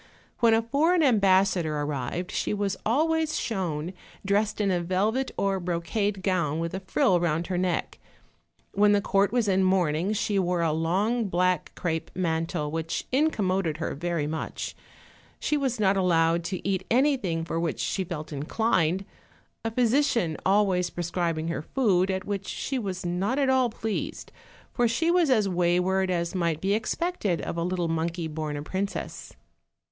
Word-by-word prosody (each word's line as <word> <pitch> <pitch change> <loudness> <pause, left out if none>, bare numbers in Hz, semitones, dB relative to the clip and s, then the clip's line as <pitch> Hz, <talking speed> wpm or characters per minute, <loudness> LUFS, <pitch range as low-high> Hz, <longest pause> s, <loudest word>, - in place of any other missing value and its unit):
When 230 -2 +5
a 225 - +1
foreign 315 +8 +2
ambassador 190 - +3
ar 145 0 -1
rived 150 +6 -3
she - - -1
was 200 -1 -1
always 315 +5 +1
shown 180 -6 -2 0.3
dressed 205 +2 +1
in 200 -2 +2
a 175 -1 +1
velvet 210 +9 0
or 195 -1 +1
brocade 180 +3 -2
gown 170 -6 +1
with 165 +1 -3
a 190 - -2
frill 185 -1 +2
round 170 -1 0
her 180 0 -2
neck; 180 -2 -1 0.7
when 205 +1 +4
the 205 - +4
court 195 0 +2
was 240 -3 +1
in 190 -1 +3
mourning 180 -1 +2
she 205 -1 0
wore 180 -2 0
a 165 - +2
long 195 +9 +1
black 180 -2 0
crape 160 -2 -2
mantle 165 -3 -1
which 165 0 -3
incommoded 195 - +1
her 160 - -3
very 170 0 -2
much; 155 +1 -4 0.6
she 300 - 0
was 265 -5 -1
not 200 -2 +3
allowed 170 -2 +2
to 185 +1 -4
eat 190 -1 0
anything 240 - +1
for 165 0 -2
which 165 -2 -2
she 190 - -1
felt 160 -3 -6
inclined, 175 +3 0 0.6
a 225 - 0
physician 235 - +2
always 190 -3 +2
Erescribing 170 -2 -2
her 170 - -2
food, 190 - +1
at 190 0 -2
which 200 -1 -3
she 265 -1 -3
was 190 -4 -4
not 190 +9 0
at 275 -2 +2
all 260 -2 +3
pleased, 220 -1 -4 0.5
:>r 240 - +5
she 320 +9 +1
was 350 -4 +3
as 220 -6 +3
wayward 180 +1 +1
as 170 -2 -1
might 170 -4 0
be 195 +3 +1
expected 220 - -1
of - - -4
a 170 - -1
little 180 -1 -1
monkey 165 +1 -2
born 155 -1 -4
a 145 - -5
princess. 190 +5 -4
185 Hz, 165 wpm, -26 LUFS, 170-215 Hz, 0.7 s, When